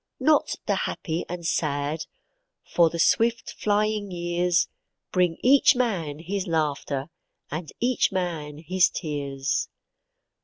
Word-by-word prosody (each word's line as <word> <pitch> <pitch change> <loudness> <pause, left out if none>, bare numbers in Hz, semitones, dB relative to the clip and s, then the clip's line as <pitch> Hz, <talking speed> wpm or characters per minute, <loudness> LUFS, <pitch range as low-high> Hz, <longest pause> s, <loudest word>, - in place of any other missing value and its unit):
Not 305 -1 +3
the - - +1 0.2
happy 165 0 -3
and 175 -1 -5
sad, 150 0 -1 0.7
for 170 -2 +5
the 170 - -5
swift 230 +7 +2
flying 210 0 +1
years 175 0 +1 0.4
Bring 180 -3 +2
each 275 +2 +6
man 185 - -1
his 190 +4 -3
laughter 150 -2 -1 0.4
and 155 +2 -4
each 245 +1 +2
man 165 -6 -3
his 180 +4 +2
tears. 140 -4 -2
170 Hz, 115 wpm, -25 LUFS, 155-200 Hz, 0.7 s, each